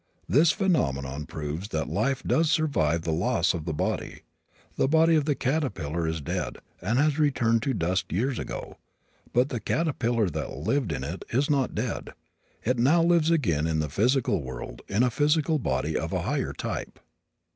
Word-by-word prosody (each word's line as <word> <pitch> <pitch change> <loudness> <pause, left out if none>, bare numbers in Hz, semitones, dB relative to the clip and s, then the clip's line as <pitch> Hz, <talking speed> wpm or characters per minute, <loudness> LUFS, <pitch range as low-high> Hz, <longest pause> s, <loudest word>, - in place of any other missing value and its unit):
This 155 +4 +5
phenomenon 75 - 0
proves 80 +5 -5
that 80 -6 -2
life 130 +6 0
does 160 -1 +2
survive 85 - +1
the 85 - -1
loss 90 +2 +1
of 80 -3 -4
the 85 - -2
body. 75 - -2 0.5
The - - +2
body 160 +3 +4
of 155 -3 +3
the 150 -2 +1
caterpillar 105 - -1
is 80 -1 -2
dead 70 - -3 0.2
and 110 +7 0
has 150 +2 +3 0.2
turned 115 -1 +2
to 135 -3 -1
dust 90 +1 -1
years 120 - 0
ago, - - -6 0.5
but 125 +3 +2
the 125 - -3
caterpillar 120 - 0
that - - -4
lived 110 - 0
in 65 -3 -3
it 85 +7 -5
is 140 +5 +1
not 135 -3 +1
dead. - - -3 0.5
It 125 +1 0
now 155 +8 +4
lives 170 -2 +3
again 85 - +2
in 80 -1 0
the 75 -1 -1
physical 115 - +2
world 65 -2 -7
in 105 +5 +2
a 125 - +2
physical 150 +3 +2
body 75 - -1
of - - -2
a - - -1
higher - - -1
type. - - -5
115 Hz, 180 wpm, -27 LUFS, -, 0.5 s, This